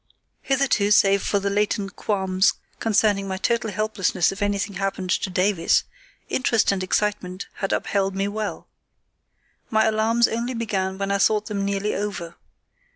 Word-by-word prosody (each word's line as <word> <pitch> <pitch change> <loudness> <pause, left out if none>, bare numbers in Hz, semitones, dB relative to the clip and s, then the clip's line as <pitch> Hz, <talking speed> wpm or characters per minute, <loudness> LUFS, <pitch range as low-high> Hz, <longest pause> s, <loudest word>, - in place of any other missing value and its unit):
Hitherto, 270 -7 +1
save 200 -1 +5
for 205 - 0
the 200 0 -1
latent 205 -1 -1
qualms 190 -2 +1 0.2
concerning 210 -2 +2
my 190 -1 -3
total 230 +2 0
helplessness 205 -3 0
if 195 +2 -8
anything 205 -1 -1
happened 195 -2 -2
to - - 0
Davies, 185 -1 +2 0.4
interest 230 -5 +2
and 195 -1 -1
excitement 185 -1 -1
had 195 - -2
upheld 195 -1 0
me 195 +1 0
well. 210 0 -4 1.0
My 220 0 +3
alarms 225 +2 +3
only 235 +2 -3
began 195 -4 -2
when 200 0 -2
I 200 - +1
thought 210 +1 +3
them 200 -2 -3
nearly 200 +1 -1
over. 190 -5 -4
200 Hz, 150 wpm, -23 LUFS, 195-215 Hz, 1.0 s, save